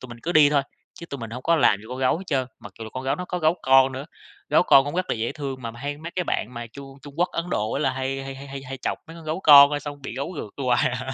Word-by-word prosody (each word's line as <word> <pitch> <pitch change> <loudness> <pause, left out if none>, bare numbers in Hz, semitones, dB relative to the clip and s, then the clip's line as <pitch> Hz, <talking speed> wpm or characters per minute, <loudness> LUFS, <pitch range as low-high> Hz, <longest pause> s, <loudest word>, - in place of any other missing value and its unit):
tụi 130 - -10
mình 120 -1 -11
cứ 175 - -2
đi 150 -3 +6
thôi, 145 -2 +2 0.3
chứ 170 - -10
tụi 140 - -7
mình 115 -2 -7
hổng 125 +3 -7
có 170 0 +3
làm 120 -8 +4
gì 105 - -15
con 125 +1 -6
gấu 130 +4 +1
hết 190 - -9
trơn. 135 -5 0
Mặc 120 - -11
dù 115 - -7
là 110 - -9
con 130 +3 -6
gấu 135 - +1
nó 180 - -5
có 180 0 -4
gấu 160 0 +2
con 135 0 +5
nữa, 135 +3 -6 0.4
gấu - - +4
con 135 - +6
cũng 145 - -5
rất 185 +1 -1
là - - +1
dễ 115 +1 -3
thương, 135 -3 -6
mà 115 - -4
hay 145 +4 -5
mấy 165 +2 -7
cái 180 - 0
bạn 125 -6 -3
mà 120 0 -6
Trung 135 +3 -12
Trung 145 -1 -12
Quốc, 175 +2 +1
Ấn 165 - -2
Độ 110 -6 -1
á - - -2
là 135 -3 +1
hay 135 +1 -3
hay 135 0 -6
hay 135 +1 -10
hay 135 0 -8
hay 135 0 -7
chọc - - -3
mấy 165 - -11
con 165 - -12
gấu 155 +4 -3
con, 145 -4 +9
ơ, 145 - -1
xong 145 -1 -8
bị 125 - -6
gấu 140 +7 -4
rượt 135 +1 -6
hoài 125 -1 +3
à. 125 +1 -5
135 Hz, 340 wpm, -24 LUFS, 130-150 Hz, 0.4 s, con